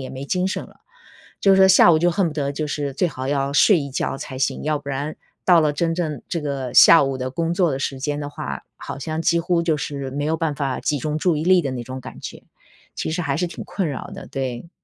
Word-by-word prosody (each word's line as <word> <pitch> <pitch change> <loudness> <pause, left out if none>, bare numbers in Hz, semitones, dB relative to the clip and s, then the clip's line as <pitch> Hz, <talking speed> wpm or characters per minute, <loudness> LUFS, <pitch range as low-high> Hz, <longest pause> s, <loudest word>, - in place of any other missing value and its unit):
也 130 - -6
没 135 +1 -7
精 180 +5 -1
神 - - -3
了。 - - -19 0.6
就 195 - +5
是 190 - +5
说 190 0 +7
下 185 -2 +7
午 160 - +5
就 175 +2 +3
恨 195 +1 +1
不 150 - -7
得 140 -2 -1
就 150 +1 -3
是 145 -1 -3
最 175 +6 0
好 130 -4 -6
要 140 0 0
睡 195 +3 +6
一 140 -1 -5
觉 - - -2
才 135 -3 -7
行， 135 - -1
要 150 -1 0
不 140 -1 -7
然 145 +3 -3 0.3
到 175 -3 +6
了 150 -1 +2
真 165 +2 0
正 155 -6 -3
这 170 - -2
个 135 -4 -4
下 165 -2 +8
午 135 -1 -1
的 130 0 -4
工 165 +4 -1
作 175 -3 +2
的 135 - -2
时 135 -1 -3
间 145 +2 -2
的 145 - -4
话， 70 - -6
好 - - -7
像 155 +3 -3
几 170 0 +2
乎 170 0 +1
就 165 -2 +1
是 140 -2 -4
没 145 +2 -3
有 160 +1 +1
办 160 -2 -1
法 135 -3 -2
集 145 -2 0
中 150 +3 -2
注 165 0 +1
意 155 - -2
力 180 -1 +5
的 140 - -2
那 125 -2 -4
种 130 +2 -7
感 - - -10
觉， - - -8 0.5
其 - - -3
实 175 +2 -2
还 140 -2 -1
是 180 - 0
挺 170 - -8
困 190 -5 -2
扰 140 - -6
的， - - -9
对。 130 +3 -5
150 Hz, 290 characters per minute, -22 LUFS, 135-170 Hz, 0.6 s, 下